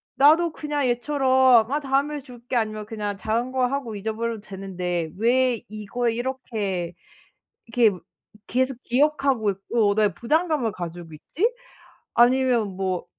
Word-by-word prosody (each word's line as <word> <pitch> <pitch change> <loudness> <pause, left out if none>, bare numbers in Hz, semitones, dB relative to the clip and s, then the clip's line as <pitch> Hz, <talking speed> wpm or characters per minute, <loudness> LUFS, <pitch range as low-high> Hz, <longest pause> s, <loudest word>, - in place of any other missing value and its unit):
나도 320 +4 +5
그냥 295 -3 -2
얘처럼 260 -2 +4
"아 295 - +1
다음에 280 +2 0
줄게." 245 -1 -8
아니면 215 -2 -1
그냥 210 -2 -4
작은 230 +5 -1
거 255 -1 +1
하고 255 -5 -3
잊어버려도 220 +2 -3
되는데 180 -4 -4
왜 245 +1 +2
이거에 225 +3 -2
이렇게 215 -8 -3 0.7
이렇게 230 -4 +3 0.5
계속 260 +1 0
기억하고 275 -4 +2
있고 200 +2 0
나의 210 -2 +2
부담감을 300 -3 0
가지고 170 -2 -7
있지?' 350 - -1 0.6
아니면 245 -3 +3
뭐 185 -2 -2
235 Hz, 290 characters per minute, -24 LUFS, 210-265 Hz, 0.7 s, 나도